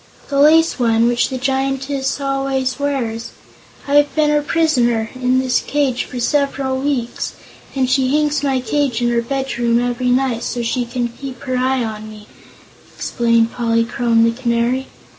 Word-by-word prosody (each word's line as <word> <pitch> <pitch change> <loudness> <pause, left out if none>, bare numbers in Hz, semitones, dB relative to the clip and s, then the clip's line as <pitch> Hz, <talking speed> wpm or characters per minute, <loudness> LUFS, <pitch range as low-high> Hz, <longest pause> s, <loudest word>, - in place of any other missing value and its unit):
"The 280 -1 0
lace 320 +1 +5
one, 230 -1 +3
which 240 0 +1
the 260 - -3
Giantess 270 +1 -1
always 270 -1 -1
wears. 245 -5 -2 0.5
I 280 - -2
have 290 0 +3
been 305 -1 +3
her 295 0 +2
prisoner, 245 -8 +1
in 255 0 +1
this 255 -1 +2
cage, 275 -4 -1
for 250 - -7
several 275 0 0
weeks, 265 -4 -2 0.4
and 265 -1 +1
she 260 0 +2
hangs 300 0 +1
my 270 -3 0
cage 255 -1 0
in 240 - +2
her 235 0 +1
bedroom 240 -2 0
every 245 +1 -1
night, 250 -2 +1
so 240 0 -3
that - - -3
she 245 +1 -1
can 240 0 -2
keep 255 +1 -9
her 255 -1 -2
eye 255 0 +1
on 215 -1 -6
me," 210 -1 -12 0.7
explained 230 -1 +1
Polychrome 230 0 +1
the 230 - +3
Canary. 240 +2 -1
255 Hz, 165 wpm, -18 LUFS, 235-275 Hz, 0.7 s, lace